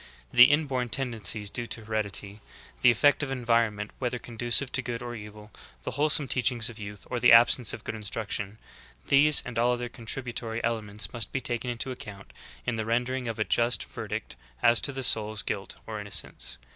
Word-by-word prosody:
The 120 +1 +10
inborn 135 -4 +1
tendencies 110 -5 -1
due 120 -1 -4
to 110 -2 -6
heredity, 105 -1 -2 0.4
the 125 - +7
ef 120 - +3
fect 145 +5 +4
of 145 - -2
environment 115 -5 0
whether 125 -1 -1
conducive 120 +3 0
to - - 0
good 120 -1 -5
or 120 0 -5
evil, 105 -1 -10 0.3
the - - -3
wholesome 145 +2 +2
teachings 120 -2 +1
of 115 - -13
youth, 105 -1 -8
or 125 - -1
the 120 +1 +6
absence 115 0 +6
of - - -7
good - - -4
in 110 - -7
struction 105 0 -4 0.2
— 60 0 -24
these 145 +1 +6
and 115 -2 -3
all 120 +1 +3
other 120 0 -3
contributory 115 -1 -5
elements 110 -3 -2
must 120 -3 -2
be 135 - -1
taken 120 0 -1
into 120 +2 -2
account 105 -5 -10 0.3
in 115 - -1
the 110 - -2
rendering 125 +2 -1
of 115 -1 -3
a 110 - +1
just 120 +2 +1
verdict - - -6 0.3
as 115 0 +6
to 140 - 0
the 135 -1 -5
soul's 110 -3 +2
guilt 100 -1 -4
or 110 -1 -5
innocence. 60 -11 -4
115 Hz, 195 wpm, -28 LUFS, 105-125 Hz, 0.4 s, The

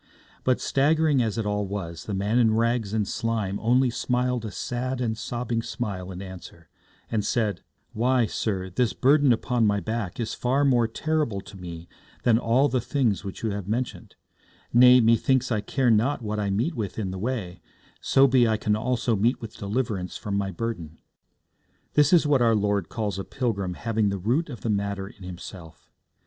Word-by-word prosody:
But, 130 -1 +2
staggering 150 0 +2
as 115 -1 -1
it 115 - -1
all 105 -1 -1
was, 85 -4 -5
the 100 - -3
man 105 +5 +1
in 110 -2 +4
rags 115 -2 +1
and 105 -2 0
slime 110 -4 -2
only 125 +2 +3
smiled 125 0 -1
a - - -3
sad 125 +4 -3
and 115 -3 -1
sobbing 120 0 -3
smile 95 -6 -5
in 90 +1 -7
answer, 90 -4 -11 0.4
and 110 -2 0
said: 105 -4 0 0.3
'Why, 125 +2 +2
sir, 95 -4 -3
this 120 +5 +1
burden 140 0 +4
upon 120 -1 +1
my 100 0 +2
back 110 0 -4
is 115 - -2
far 135 +3 +1
more 120 -4 +3
terrible 150 -3 -1
to 100 - -13
me 85 -2 -8 0.4
than 115 -2 +4
all 125 +5 +3
the 130 -3 0
things 120 -7 0
which 100 +1 -7
you 110 - 0
have 100 -2 -5
mentioned; 120 +4 -3 0.6
nay, 125 +1 +8
methinks 120 +3 +3
I 110 -3 +1
care 130 +1 +1
not 115 +4 +2
what 105 0 -2
I 100 -1 -1
meet 115 - 0
with 110 - -4
in 100 -4 -2
the 95 - -5
way, 105 -6 -3 0.4
so 135 - +4
be 125 -2 +4
I 110 -1 +1
can 105 0 +1
also 120 +1 0
meet 115 +6 +1
with 115 0 -9
deliverance 100 -3 -2
from 100 -1 -4
my 100 -1 0
burden.' 85 -5 -5 1.0
This 150 -1 +4
is 170 -4 +5
what 145 -3 +3
our 115 -2 +4
Lord 100 -3 0
calls 105 -4 -3
a - - -3
pilgrim 100 -9 -2
having 110 -1 0
the 100 - -2
root 125 - 0
of 120 -7 -8
the 115 - -2
matter 100 -1 -2
in 100 - -16
himself. 90 -2 -10
115 Hz, 190 wpm, -25 LUFS, 100-125 Hz, 1.0 s, nay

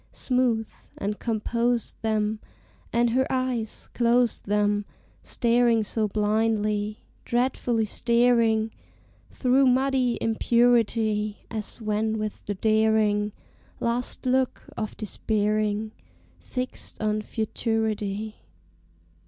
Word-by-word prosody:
Smooth 245 -4 +1 0.3
and 210 +1 -3
compose 235 +1 0
them; 215 -1 0 0.5
And 235 0 +2
her 260 +2 +2
eyes, 255 -4 -2
close 240 0 +2
them, 205 0 +1 0.4
Staring 235 -2 +2
so 215 +1 -1
blindly! 210 0 0 0.2
Dreadfully 240 -2 0
staring 230 -1 +2 0.6
Through 265 +1 +3
muddy 255 -1 +2
impurity, 225 -2 +2
As 220 0 -5
when 220 0 -1
with 215 -1 -4
the 205 - -2
daring 215 0 +2 0.5
Last 240 +3 -1
look 255 0 +1
of 215 - -4
despairing 215 0 -1 0.5
Fixed 255 0 -5
on 215 0 0
futurity. 215 -1 -2
220 Hz, 90 wpm, -26 LUFS, 215-240 Hz, 0.6 s, Through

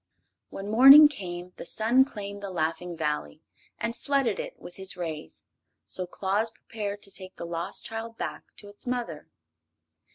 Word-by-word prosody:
When 200 +2 -6
morning 275 +6 +10
came 180 -8 -6
the - - -7
sun 240 +4 +4
claimed 200 -5 -7
the 200 - -5
Laughing 170 0 -2
Valley 150 - -3 0.3
and 230 - -3
flooded 275 - 0
it - - -6
with 175 - -11
his 190 -1 -4
rays; 160 - -6 0.4
so 185 -1 -1
Claus 200 +5 0
prepared 205 -2 -6
to 195 - -5
take 185 -1 -7
the - - -6
lost 170 0 -3
child 225 0 -6
back - - -5
to 205 - -11
its 205 +4 -12
mother. 245 -1 -3
200 Hz, 160 wpm, -27 LUFS, 180-230 Hz, 0.4 s, morning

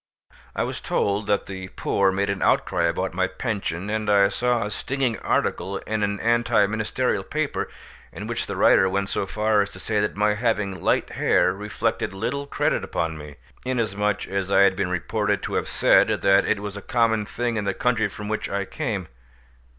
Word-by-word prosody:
I - - 0
was - - -4
told 100 +1 0
that 100 -1 +1
the 95 -1 -7
poor 95 +1 +1
made 100 +1 0
an 100 - -4
outcry 85 - +2
about 90 +2 -1
my 95 +1 +1
pension, 95 -3 -3
and 110 -1 -1
I 100 -1 +5
saw 120 +2 0
a 105 - -5
stinging 130 -2 -1
article 95 +1 -1
in 110 +2 -3
an 100 0 0
anti 115 -3 +3
ministerial 110 +1 -1
paper, - - -2 0.4
in - - -7
which - - -3
the - - -4
writer 95 - +5
went 100 +1 -1
so 95 - -2
far 105 +1 +2
as 100 - -2
to - - -12
say 110 -2 -1
that 105 0 -1
my 105 +1 +2
having 105 -4 -1
light - - +1
hair 90 - +2
reflected 105 +1 -2
little 140 +8 -3
credit - - 0
upon 80 -1 -2
me, 75 -1 -10 0.3
inasmuch 105 -5 -1
as 100 0 -2
I - - +5
had 100 -1 +5
been 95 -2 -1
reported 105 +2 -1
to - - -4
have - - 0
said - - +4
that 100 0 +3
it 105 -2 +1
was 105 -1 -5
a 105 - -6
common 110 -2 +1
thing 120 -1 -2
in 105 -2 -2
the 100 -1 -1
country 120 -3 +1
from 105 +1 -8
which 110 0 -2
I 100 0 -2
came. 100 - -3
105 Hz, 195 wpm, -24 LUFS, 95-110 Hz, 0.4 s, I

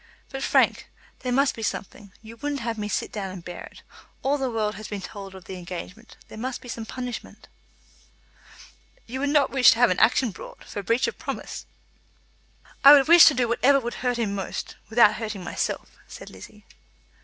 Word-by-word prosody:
"But, 270 -1 -6
Frank, - - +2 0.3
there 250 - -3
must 275 +2 +2
be 225 - -8
something. 205 -1 -5
You 225 +1 -11
wouldn't 285 +1 -3
have 230 0 -2
me 210 - -3
sit - - -2
down 200 -3 -4
and 185 -2 -9
bear 175 - -7
it. - - -15 0.4
All 285 +2 +1
the 265 -1 -1
world 215 -2 -1
has 215 0 -8
been 205 - -5
told 195 0 -9
of 185 - -12
the 190 - -7
engagement. 180 +5 -9
There 220 - -10
must 255 +2 -4
be - - -13
some 225 -1 -6
punishment." 250 -2 -7 1.6
"You 255 +3 -6
would 285 +1 0
not 290 -2 +3
wish 260 -3 +6
to - - -7
have 240 -3 +4
an 180 - 0
action 235 +1 +3
brought, - - -12
for 205 - -6
breach 230 +5 +1
of - - -6
promise?" - - -6 1.2
"I 280 +1 +11
would 280 -1 +6
wish 340 0 +9
to 300 - +6
do 245 -1 +1
whatever 270 +4 +3
would 240 -2 -5
hurt 245 -1 0
him 220 -4 -1
most, 195 -2 -5
without 220 -1 +5
hurting 215 -4 -5
myself," - - -4
said - - -11
Lizzie. 210 0 -14
230 Hz, 200 wpm, -25 LUFS, 205-260 Hz, 1.6 s, I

